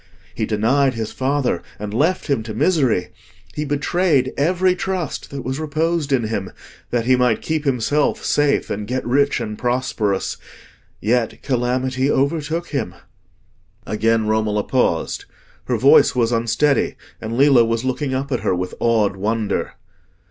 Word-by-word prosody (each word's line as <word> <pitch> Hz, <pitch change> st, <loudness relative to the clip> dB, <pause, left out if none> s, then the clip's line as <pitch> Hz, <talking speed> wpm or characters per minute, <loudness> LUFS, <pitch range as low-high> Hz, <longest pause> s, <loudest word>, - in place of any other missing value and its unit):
He -, -, -2 dB
denied 130 Hz, +5 st, +2 dB
his 110 Hz, -1 st, -4 dB
father, 130 Hz, -8 st, 0 dB, 0.2 s
and 105 Hz, 0 st, -6 dB
left 160 Hz, +10 st, +1 dB
him 140 Hz, -6 st, 0 dB
to 110 Hz, -1 st, -7 dB
misery; 135 Hz, -, +2 dB, 0.4 s
he 150 Hz, -, -3 dB
betrayed 145 Hz, -1 st, +1 dB
every 180 Hz, +5 st, +2 dB
trust 185 Hz, -5 st, -3 dB
that 140 Hz, -2 st, -6 dB
was 130 Hz, +4 st, -3 dB
reposed 155 Hz, 0 st, -1 dB
in 130 Hz, -3 st, +2 dB
him, 105 Hz, -4 st, -3 dB, 0.4 s
that 120 Hz, -2 st, -1 dB
he 130 Hz, +1 st, +4 dB
might 125 Hz, -3 st, +1 dB
keep 155 Hz, -1 st, -2 dB
himself 140 Hz, +3 st, 0 dB
safe 145 Hz, -1 st, +1 dB
and 105 Hz, 0 st, -3 dB
get 130 Hz, +2 st, -2 dB
rich 140 Hz, +3 st, +2 dB
and 105 Hz, -2 st, -5 dB
prosperous. 120 Hz, -5 st, -1 dB, 0.6 s
Yet 115 Hz, +1 st, 0 dB
calamity 130 Hz, +1 st, 0 dB
overtook 155 Hz, +5 st, 0 dB
him." 135 Hz, -, -3 dB, 0.9 s
Again 110 Hz, +1 st, +1 dB
Romola 105 Hz, -1 st, +1 dB
paused. 125 Hz, -10 st, 0 dB, 0.4 s
Her -, -, 0 dB
voice -, -, +5 dB
was 120 Hz, -2 st, +2 dB
unsteady, 115 Hz, +5 st, +1 dB, 0.3 s
and 115 Hz, +1 st, -4 dB
Lillo 135 Hz, -3 st, +6 dB
was 115 Hz, +1 st, -1 dB
looking 130 Hz, +1 st, -1 dB
up 140 Hz, +2 st, -3 dB
at 125 Hz, -, 0 dB
her 100 Hz, -3 st, 0 dB
with 90 Hz, 0 st, -4 dB
awed 110 Hz, -4 st, +2 dB
wonder. 105 Hz, +2 st, -2 dB
130 Hz, 150 wpm, -20 LUFS, 110-145 Hz, 0.9 s, Lillo